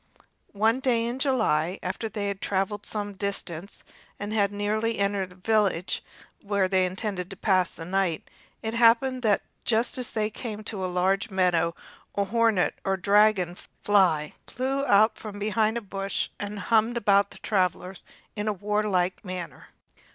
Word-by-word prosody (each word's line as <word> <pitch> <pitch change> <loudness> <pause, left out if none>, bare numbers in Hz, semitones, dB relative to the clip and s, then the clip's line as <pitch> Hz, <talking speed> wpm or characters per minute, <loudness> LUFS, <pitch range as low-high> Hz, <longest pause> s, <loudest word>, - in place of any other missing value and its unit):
One 220 +4 +3
day 240 -3 +1
in 240 +2 -3
July, 210 - +1
after 190 +5 -3
they 210 -2 -3
had 200 -1 -4
traveled 200 +1 -1
some 205 -1 -3
distance, 195 -2 -4 0.4
and 205 +1 -4
had 205 -2 +2
nearly 215 +2 -1
entered 200 -1 0
the 180 - -16
village 195 -2 0 0.4
where 200 -2 +1
they 185 -1 +2
intended 185 -1 -3
to 195 - -8
pass 185 -2 +2
the 165 - -7
night, 185 -2 -1 0.4
it 220 0 -2
happened 240 +3 +4
that 210 -4 +2 0.2
just 230 +3 +1
as 250 - -2
they 215 -1 -1
came 215 -1 -6
to 205 -3 -5
a - - 0
large 190 +4 +1
meadow 175 -3 +1 0.4
a 200 - +2
hornet 225 -2 +2
or 195 0 0
dragon 200 -2 +3 0.3
fly 180 -7 +3
flew 270 +2 -1
out 215 0 +4
from 210 -2 -7
behind 215 +2 +1
a - - -3
bush 195 -1 -3
and 205 0 -5 0.2
hummed 225 +2 +4
about 200 -2 +3
the - - -12
travelers 185 -1 -1 0.3
in 210 0 -3
a 215 - +2
warlike 200 -2 0
manner. 180 -3 -7
205 Hz, 160 wpm, -26 LUFS, 190-220 Hz, 0.4 s, happened